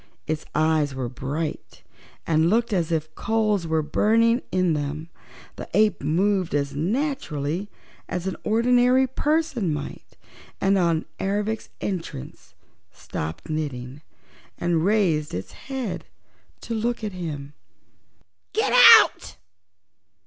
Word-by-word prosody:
Its 155 0 -3
eyes 155 -2 +2
were 130 -2 -3
bright 140 +6 -5 0.4
and 160 0 +3
looked 230 +2 +1
as 170 -4 0
if 155 -1 -2
coals 215 -5 0
were 160 -1 +1
burning 230 - +3
in 185 -3 +2
them. 150 +2 -4 0.5
The - - -8
ape 215 0 +3
moved 180 +3 +1
as 140 -1 -1
naturally 185 - -2 0.4
as 180 0 -3
an 190 - -2
ordinary 245 +3 +3
person 275 - 0
might, 150 - -7 0.4
and 195 0 +2
on 170 -4 +1
Ervic's 205 +3 -2
entrance 175 - -6 0.4
stopped 80 +2 -6
knitting 140 -3 -4 0.6
and 170 -2 0
raised 180 - +1
its 95 - -6
head 265 -7 -5 0.6
to 230 - -5
look 230 +1 -2
at 210 -2 -3
him. 150 -5 -6 1.0
"Get - - +1 0.3
out!" - - -5
175 Hz, 115 wpm, -24 LUFS, 155-220 Hz, 1.0 s, and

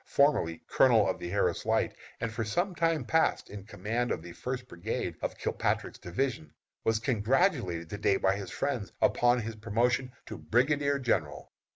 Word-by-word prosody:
formerly 140 - +2
Colonel 115 -6 +5
of 95 - -1
the 85 - -5
Harris 100 +3 0
Light, - - +1 0.2
and 115 - -2
for 115 +1 -2
some 175 - -1
time 165 -2 +1
past 160 0 +1
in 100 -1 -8
command 115 +4 -2
of - - -2
the 85 - -9
First 125 +3 -5
brigade 90 -1 -4
of - - -3
Kilpatrick's - - -1
division, 90 - -3 0.3
was 110 0 +2
congratulated 110 - +1
to 105 - -5
day 100 -1 +3
by 95 0 +2
his 100 -1 -6
friends - - -2
upon 120 0 +3
his 115 0 -5
promotion 120 +4 0
to - - -8
brigadier 140 +4 +2
general. 95 - -1
115 Hz, 170 wpm, -30 LUFS, 100-130 Hz, 0.3 s, Colonel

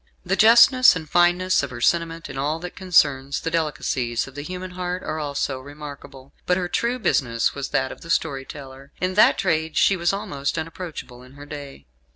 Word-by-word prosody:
The 190 +2 +1
justness 235 +3 +7
and 160 -3 -6
fineness 175 +3 +3
of 140 - -4
her 125 -2 -8
sentiment 165 +4 0
in - - -9
all 145 +4 -1
that 180 0 -7
concerns 145 -7 +2
the 165 - -3
delicacies 135 -7 -1
of 135 - -13
the 145 - -6
human 180 +4 -7
heart 180 0 -4
are 155 - -4
also 140 -2 -2
remarkable. 140 -1 -11
But 180 - +2
her 180 -1 -2
true 235 +7 -1
business 120 - 0
was 140 -1 -5
that 130 0 0
of - - -11
the 165 - -12
storyteller. 135 -2 -4
In 185 +1 -1
that - - +5
trade 160 -1 -1
she 195 - +4
was 175 -1 +1
almost 145 -8 -3
unapproachable 160 -6 -7
in 130 +1 -16
her 145 +1 -11
day. 145 - -9
155 Hz, 195 wpm, -23 LUFS, 135-180 Hz, -, justness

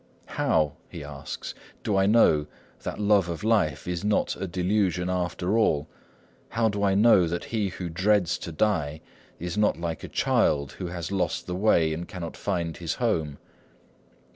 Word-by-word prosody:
"How," 75 -2 +1 0.2
he - - -8
asks, 70 -1 -7 0.3
"do 105 - 0
I 95 0 +3
know 80 -9 +4 0.3
that - - -5
love 100 -4 +3
of 85 +4 -5
life 105 -10 +1
is 90 +1 -2
not 105 0 +1
a 95 - -4
delusion 90 0 0
after 90 +2 -1
all? 75 -9 +2 0.6
How 115 -1 +1
do 100 -1 -3
I 100 -1 +3
know 100 -4 +6
that 85 +1 -3
he 110 -3 -1
who 90 -1 -5
dreads 90 +1 +1
to 85 - -6
die 80 -4 0 0.4
is 90 +4 -3
not 105 -5 +2
like 85 -2 -4
a - - -5
child 70 -2 +1
who 90 - -6
has 85 0 -5
lost 95 -2 -1
the 90 - -4
way, 90 -5 +3
and 85 +2 -5
cannot 85 -3 -6
find 85 -3 -2
his - - -3
home? 75 -3 -1
90 Hz, 170 wpm, -26 LUFS, 80-100 Hz, 0.6 s, know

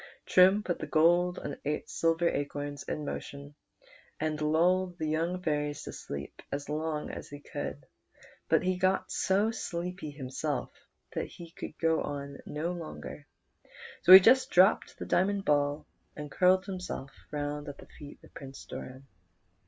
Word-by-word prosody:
Trim 190 +3 +5
put 175 - -2
the - - -5
gold 175 +3 +3
and 145 - -5 0.3
silver 165 +1 +1
acorns 145 -1 -3
in 150 - -4
motion, 140 0 -6 0.7
and 155 0 -2
lulled 175 +4 +2
the 160 - -2
young 170 +4 -1
fairies 150 -2 -1
to - - -7
sleep 70 0 -7
as 145 0 -4
long 155 0 -2
as - - -8
he 145 - -9
could; - - -6 0.6
but - - +4
he 185 0 +1
got 185 +1 +1
so 200 +4 +2
sleepy 180 -5 -4
himself 140 0 -3 0.4
that - - -2
he 170 -1 -12
could 155 - -8
go 165 -1 +2
on 140 -1 -5
no 155 +4 -2
longer, 160 -3 -8 0.7
so 180 - +5
he 190 - +15
just 260 +7 +5
dropped 185 +4 +4
the - - -6
diamond 195 +2 +1
ball, 145 0 +1 0.3
and 150 -1 -7
curled 185 +1 +4
himself 180 -8 -5 0.2
round 145 0 -3
at 140 - -8
the - - -12
feet 145 -1 -12
of - - -18
Prince 135 -1 -10
Doran. 130 +1 -8
155 Hz, 155 wpm, -30 LUFS, 145-180 Hz, 0.7 s, he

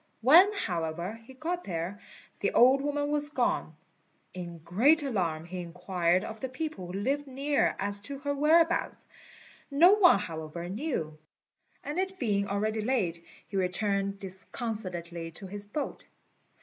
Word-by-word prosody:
When, 335 - +7
however, 175 - -3
he 265 +2 -13
got 345 +6 -3
there, 175 +2 -4 0.4
the - - 0
old 260 +3 +6
woman 290 0 -1
was 295 0 0
gone. 295 - -1 0.6
In 175 -2 -7
great 285 - +4
alarm 175 - -1
he 180 +1 -6
inquired 180 +1 0
of 220 0 -7
the 260 - -4
people 260 - -5
who 175 - -7
lived 275 +9 -1
near 275 +2 +1
as 200 0 -1
to 275 +7 -5
her 285 +1 -2
whereabouts; 330 +4 +2 0.6
no 315 +6 +6
one, 380 - +6
however, 165 -1 -6
knew; 190 - -3 0.6
and 295 +5 -3
it 380 0 -2
being 200 - 0
already 215 +2 -1
late 195 -9 -1 0.2
he 195 - -4
returned 195 +1 +1
disconsolately 185 -3 -4
to 195 - -7
his 205 +2 -3
boat. 285 +8 -5
210 Hz, 145 wpm, -29 LUFS, 180-285 Hz, 0.6 s, When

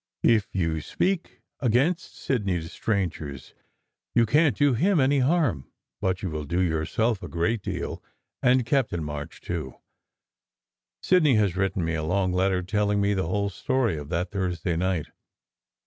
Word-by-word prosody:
If 110 -3 +4
you 80 -4 0
speak 185 - -2 0.2
against 140 +9 +1
Sidney 100 -9 -1
to 80 0 -7
strangers, 85 - -3 0.6
you 120 -1 +5
can 150 +6 +4
t 145 - +3
do 140 - +4
him 175 - +2
any 135 +1 +3
harm, 135 - +1 0.3
but 95 0 -1
you 95 - -2
will 75 -1 -4
do 85 +5 -1
yourself 90 +6 0
a - - -6
great 100 +7 0
deal, - - -4 0.4
and 125 -1 +4
Captain 115 - 0
March, 75 +1 -6
too. 80 -7 -4 1.3
Sidney 155 -8 +4
has 100 -5 +2
written 95 -2 0
me 80 - -1
a 80 - -1
long 90 +2 +1
letter 95 0 +1
telling 105 +2 +1
me 100 0 +2
the 95 -4 -1
whole 100 +3 0
history 115 +1 0
of 75 -1 -7
that 90 +1 -2
Thursday 90 -4 -1
night. 90 -2 -1
95 Hz, 160 wpm, -26 LUFS, 85-120 Hz, 1.3 s, you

